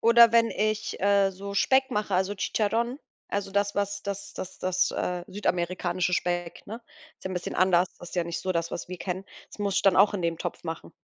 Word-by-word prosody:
Oder 235 Hz, 0 st, +7 dB
wenn 230 Hz, 0 st, +4 dB
ich, 215 Hz, 0 st, -1 dB
äh, 200 Hz, 0 st, +4 dB
so 200 Hz, +2 st, -7 dB
Speck 265 Hz, +5 st, +3 dB
mache, 210 Hz, -4 st, -1 dB
also, 190 Hz, +2 st, +1 dB
Chicharrón, 230 Hz, +6 st, 0 dB, 0.3 s
also, 200 Hz, -1 st, -2 dB
das, 200 Hz, +1 st, 0 dB
was 200 Hz, 0 st, -1 dB
das 200 Hz, 0 st, -5 dB
das 190 Hz, 0 st, -7 dB
das 185 Hz, 0 st, +1 dB
äh, 180 Hz, -1 st, -2 dB
südamerikanische 180 Hz, -2 st, -1 dB
Speck, 175 Hz, -1 st, -1 dB
ne? 225 Hz, +4 st, -7 dB, 0.4 s
Ist -, -, -19 dB
ja 190 Hz, -, -3 dB
'n -, -, -3 dB
bisschen 175 Hz, -, -4 dB
anders. 180 Hz, -1 st, +4 dB
Das 175 Hz, -, -10 dB
ist -, -, -9 dB
ja 175 Hz, -, +2 dB
nicht 170 Hz, 0 st, -4 dB
so 185 Hz, -, -1 dB
das, 170 Hz, 0 st, -1 dB
was -, -, -5 dB
wir 180 Hz, 0 st, -6 dB
kennen. 185 Hz, +1 st, -4 dB, 0.2 s
Das -, -, -14 dB
muss 200 Hz, -1 st, -1 dB
ich -, -, +3 dB
dann 195 Hz, -2 st, +5 dB
auch 205 Hz, +2 st, +5 dB
in 185 Hz, -, -2 dB
dem 165 Hz, -1 st, -1 dB
Topf 175 Hz, -, -5 dB
machen. 165 Hz, 0 st, -6 dB
195 Hz, 230 wpm, -27 LUFS, 180-205 Hz, 0.4 s, Oder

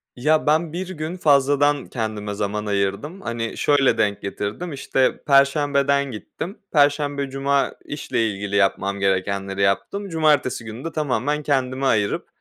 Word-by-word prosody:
Ya, 155 Hz, +5 st, +1 dB
ben 155 Hz, +1 st, +2 dB
1 185 Hz, +2 st, -4 dB
gün 165 Hz, 0 st, -5 dB
fazladan 145 Hz, -2 st, +3 dB
kendime 110 Hz, -3 st, -4 dB
zaman 105 Hz, +1 st, -3 dB
ayırdım. 100 Hz, -, -2 dB
Hani, 115 Hz, -6 st, -4 dB
şöyle 140 Hz, -5 st, +3 dB
denk 105 Hz, -2 st, 0 dB
getirdim: 105 Hz, -, -4 dB
İşte, 135 Hz, -1 st, 0 dB
perşembeden 140 Hz, 0 st, +3 dB
gittim; 165 Hz, -, -7 dB, 0.2 s
perşembe, 145 Hz, -2 st, +2 dB
cuma 135 Hz, +1 st, 0 dB
işle 115 Hz, -6 st, -1 dB
ilgili 100 Hz, 0 st, -4 dB
yapmam 100 Hz, 0 st, +1 dB
gerekenleri 95 Hz, 0 st, -1 dB
yaptım, 100 Hz, -, 0 dB
cumartesi 150 Hz, -7 st, +1 dB
günü 110 Hz, +4 st, -8 dB
de 165 Hz, -, -3 dB
tamamen 150 Hz, 0 st, -1 dB
kendime 135 Hz, -1 st, 0 dB
ayırıp 105 Hz, -5 st, +1 dB
135 Hz, 135 wpm, -22 LUFS, 105-145 Hz, 0.2 s, fazladan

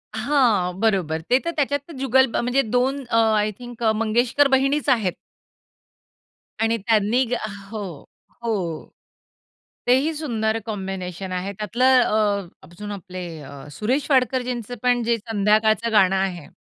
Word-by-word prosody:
हां. 220 Hz, -7 st, +1 dB
बरोबर. 185 Hz, -8 st, +1 dB
ते 250 Hz, +2 st, +5 dB
तर 335 Hz, -, 0 dB
त्याच्यात 285 Hz, 0 st, +1 dB
तर 335 Hz, -, -10 dB
जुगल 265 Hz, 0 st, +4 dB
ब -, -, -1 dB
म्हणजे 250 Hz, +3 st, +2 dB
दोन 265 Hz, +3 st, +1 dB
अ, 230 Hz, -, +2 dB, 0.2 s
आय 210 Hz, 0 st, +1 dB
थिंक 240 Hz, -1 st, -9 dB
अ, 220 Hz, -, +4 dB
मंगेशकर 240 Hz, +5 st, +2 dB
बहिणीचं 275 Hz, +2 st, +2 dB
आहेत. 210 Hz, -8 st, +1 dB, 1.5 s
आणि 225 Hz, +1 st, +2 dB
त्यांनी 220 Hz, +3 st, +2 dB
गा 245 Hz, -, +1 dB, 0.3 s
हो, 220 Hz, -2 st, -4 dB, 0.6 s
हो. 185 Hz, -9 st, -2 dB, 1.0 s
ते 245 Hz, -, +5 dB
ही 305 Hz, +4 st, 0 dB
सुंदर 225 Hz, -8 st, -1 dB
कॉम्बिनेशन 190 Hz, -3 st, -5 dB
आहे. 185 Hz, +2 st, -3 dB
त्यातलं 240 Hz, +6 st, +3 dB
अ, 210 Hz, -4 st, +1 dB, 0.2 s
अजून 205 Hz, +4 st, -8 dB
आपले 185 Hz, -2 st, -7 dB, 0.2 s
अ, 140 Hz, -, -11 dB, 0.2 s
सुरेश 250 Hz, -, -1 dB
वाडकरजींचं 250 Hz, -3 st, 0 dB
पण 245 Hz, -1 st, +2 dB
जे 235 Hz, 0 st, +1 dB
संध्याकाळचं 215 Hz, +1 st, +1 dB
गाणं 195 Hz, -3 st, +4 dB
आहे. 185 Hz, -5 st, -2 dB
225 Hz, 140 wpm, -22 LUFS, 195-250 Hz, 1.5 s, ते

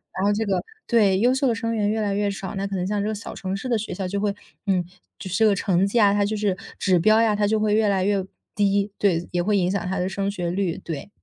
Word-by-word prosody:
然 190 Hz, -, -2 dB
后 205 Hz, -, +3 dB
这 220 Hz, +2 st, -1 dB
个 195 Hz, -2 st, 0 dB, 0.2 s
对， 205 Hz, -5 st, +3 dB
优 245 Hz, +4 st, +4 dB
秀 265 Hz, +1 st, +1 dB
的 235 Hz, -, +2 dB
生 230 Hz, 0 st, -2 dB
源 210 Hz, -2 st, +1 dB
越 220 Hz, +1 st, 0 dB
来 205 Hz, -1 st, 0 dB
越 205 Hz, 0 st, 0 dB
少， 195 Hz, 0 st, -5 dB
那 195 Hz, +1 st, -2 dB
可 195 Hz, -, -4 dB
能 180 Hz, -1 st, -1 dB
像 205 Hz, +1 st, -1 dB
这 210 Hz, -, -1 dB
个 215 Hz, -, -2 dB
小 205 Hz, -, -7 dB
城 190 Hz, 0 st, -4 dB
市 255 Hz, -, -6 dB
的 240 Hz, -, +1 dB
学 220 Hz, -, -5 dB
校 190 Hz, -1 st, -3 dB
就 200 Hz, +2 st, -2 dB
会 205 Hz, 0 st, -1 dB, 0.3 s
嗯， 185 Hz, -2 st, +2 dB, 0.3 s
就 -, -, -8 dB
是 -, -, -1 dB
这 220 Hz, -, +4 dB
个 205 Hz, -, +3 dB
成 190 Hz, -1 st, +1 dB
绩 230 Hz, +4 st, +1 dB
啊 200 Hz, -2 st, +5 dB
它 205 Hz, 0 st, +2 dB
就 215 Hz, +1 st, -2 dB
是 205 Hz, -3 st, 0 dB, 0.2 s
指 185 Hz, -3 st, +2 dB
标 215 Hz, +5 st, +5 dB
呀， 215 Hz, -2 st, +3 dB
它 205 Hz, 0 st, +1 dB
就 220 Hz, +1 st, +1 dB
会 210 Hz, -1 st, +1 dB
越 215 Hz, -1 st, +3 dB
来 190 Hz, -2 st, +1 dB
越 200 Hz, -1 st, +1 dB, 0.3 s
低， 200 Hz, 0 st, +1 dB
对， 175 Hz, -4 st, +1 dB
也 175 Hz, -, 0 dB
会 205 Hz, +3 st, +1 dB
影 180 Hz, -1 st, +1 dB
响 200 Hz, -, -1 dB
它 190 Hz, -, -2 dB
的 180 Hz, -, 0 dB
升 195 Hz, +1 st, -2 dB
学 175 Hz, -4 st, -3 dB
率。 185 Hz, -3 st, -1 dB
对。 160 Hz, +3 st, -6 dB
200 Hz, 320 characters per minute, -23 LUFS, 190-210 Hz, 0.3 s, 啊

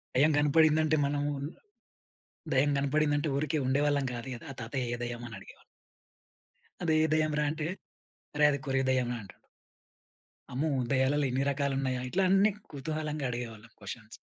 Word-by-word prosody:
దెయ్యం 150 Hz, +4 st, +5 dB
కనపడిందంటే 155 Hz, +1 st, +4 dB
మనము 145 Hz, +1 st, 0 dB, 1.2 s
దెయ్యం 140 Hz, +2 st, +3 dB
కనపడిందంటే 145 Hz, +1 st, +1 dB
ఊరికే 155 Hz, +1 st, 0 dB
ఉండేవాళ్ళం 145 Hz, +1 st, +2 dB
కాదు 120 Hz, +2 st, -6 dB
గదా! -, -, -11 dB
ఆ -, -, -18 dB
తాతయ్య 120 Hz, +1 st, -3 dB
ఏ -, -, -9 dB
దయ్యమని 120 Hz, -2 st, -5 dB
అడిగేవాళ్ళం. -, -, -15 dB, 1.2 s
అదే 160 Hz, -2 st, +2 dB, 0.2 s
దెయ్యం 155 Hz, -1 st, +2 dB
రా! 150 Hz, -, +2 dB
అంటే, 155 Hz, 0 st, -3 dB, 0.7 s
అరే! 150 Hz, 0 st, +5 dB
అది 140 Hz, -, -1 dB
కోరివి 135 Hz, -1 st, +1 dB
దెయ్యంరా 125 Hz, -2 st, +1 dB
అంటాడు. 95 Hz, -, -14 dB, 1.2 s
అమ్మో! 145 Hz, +5 st, 0 dB, 0.2 s
దెయ్యాలలో 140 Hz, +2 st, +2 dB
ఇన్ని 135 Hz, +2 st, +1 dB
రకాలున్నాయా 135 Hz, -2 st, -1 dB
ఇట్లా 190 Hz, +5 st, +1 dB
అన్నీ 195 Hz, +2 st, +5 dB, 0.2 s
కుతూహలంగా 150 Hz, 0 st, -3 dB
అడిగేవాళ్ళం 115 Hz, -2 st, -6 dB
క్వశ్చన్స్ 105 Hz, +2 st, -8 dB
140 Hz, 135 wpm, -30 LUFS, 125-155 Hz, 1.2 s, దెయ్యం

